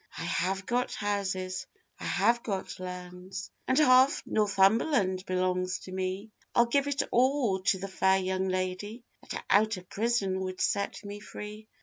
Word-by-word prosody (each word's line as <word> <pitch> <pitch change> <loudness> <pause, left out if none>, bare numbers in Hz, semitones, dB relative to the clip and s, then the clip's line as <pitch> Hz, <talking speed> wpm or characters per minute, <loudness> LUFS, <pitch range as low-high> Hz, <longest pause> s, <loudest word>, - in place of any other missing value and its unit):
'I - - -4
have 190 +2 -1
got 245 +1 0
houses, 185 -3 -2 0.3
I - - -6
have 235 0 +2
got 195 -5 -4
lands, 180 +1 -7 0.2
And 260 - +2
half 260 -2 +5
Northumberland 200 0 +2
belongs 185 0 0
to 185 - -10
me 190 +3 -3 0.2
I'll 240 - +6
give 280 +4 +1
it 285 0 0
all 250 -5 +3
to 190 +1 +2
the 195 +1 -5
fair 190 0 +3
young 190 0 -1
lady 185 +5 -3 0.3
That - - -5
out 215 +1 +3
of 180 0 -11
prison 205 -4 0
would 185 0 -4
set 200 +1 -1
me 205 0 -6
free. 210 +1 -9
195 Hz, 155 wpm, -29 LUFS, 185-225 Hz, 0.3 s, I'll